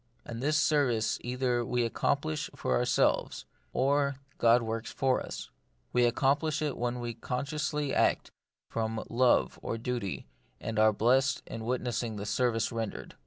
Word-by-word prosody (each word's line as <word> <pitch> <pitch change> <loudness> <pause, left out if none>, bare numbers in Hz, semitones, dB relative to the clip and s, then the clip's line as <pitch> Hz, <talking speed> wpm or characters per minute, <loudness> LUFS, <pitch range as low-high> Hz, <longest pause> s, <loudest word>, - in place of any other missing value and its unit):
And 115 0 -6
this 150 +3 +2
service 140 -8 +2
either 125 -1 0
we 120 +1 0
accomplish 80 -7 -1
for 65 - 0
ourselves, - - +1 0.3
or 140 +1 +2 0.2
God 115 +1 +5
works 115 0 -3
for 130 -1 +1
us. - - -7 0.4
We 120 -1 +4
accom 135 +4 +2
plish 155 -1 -1
it 150 -3 -1
when 120 +1 -2
we 120 -1 -3
consciously 145 +4 -2
act - - +2 0.4
from 110 -1 -2
love 125 +1 +3
or 115 - -3
duty, 120 -4 -3 0.3
and 110 -1 -3
are 110 0 +6
blest 130 +6 +2
in 110 -1 -6
witnessing 120 -2 -1
the 100 0 -5
service 120 +1 +1
rendered. 115 -2 -5
120 Hz, 150 wpm, -30 LUFS, 115-135 Hz, 0.4 s, are